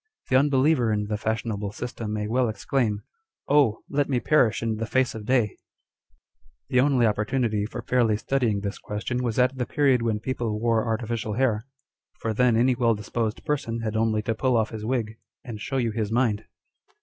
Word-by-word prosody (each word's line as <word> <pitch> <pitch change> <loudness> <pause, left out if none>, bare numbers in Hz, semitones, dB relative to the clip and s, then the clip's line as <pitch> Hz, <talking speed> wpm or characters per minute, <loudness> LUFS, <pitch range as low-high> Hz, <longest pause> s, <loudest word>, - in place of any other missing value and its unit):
The 130 - +2
unbeliever 135 -2 +3
in 105 -1 0
the 105 +1 -2
fashionable 110 -2 -2
system 115 -2 -5
may 105 0 -2
well 125 +1 +1
exclaim 110 0 -1 0.5
â€" - - 0
Oil! 135 -7 +3
let 145 0 0
me 130 -3 +1
perish 120 -6 +2
in 110 -1 -1
the 115 0 -3
face 130 +2 +1
of 110 -1 -8
day! 120 -6 +2 1.1
The 125 - +3
only 130 -3 +4
opportunity 105 0 0
for 120 +1 -7
fairly 120 -4 +2
studying 115 -5 0
this 100 0 -4
question 110 +4 -3
was 120 -3 -2
at 125 +1 +3
the 125 - -1
period 135 -4 +3
when 115 -2 0
people 115 -3 -2
wore 115 0 +1
artificial 115 -1 -2
hair; 115 -1 0 0.5
for 115 - -2
then 120 0 +3
any 125 +2 +4
well 115 -2 +2
disposed 110 +1 -3
person 125 -7 -2
had 110 -1 -3
only 110 -1 +1
to 115 - 0
pull 125 +2 +1
off 110 -1 0
his 110 -2 -6
wig, 115 -2 -2 0.3
and 110 -4 -7
show 135 - -2
you 120 -3 +1
his 110 -1 -2
mind. 115 -3 +1
115 Hz, 190 wpm, -25 LUFS, 110-125 Hz, 1.1 s, only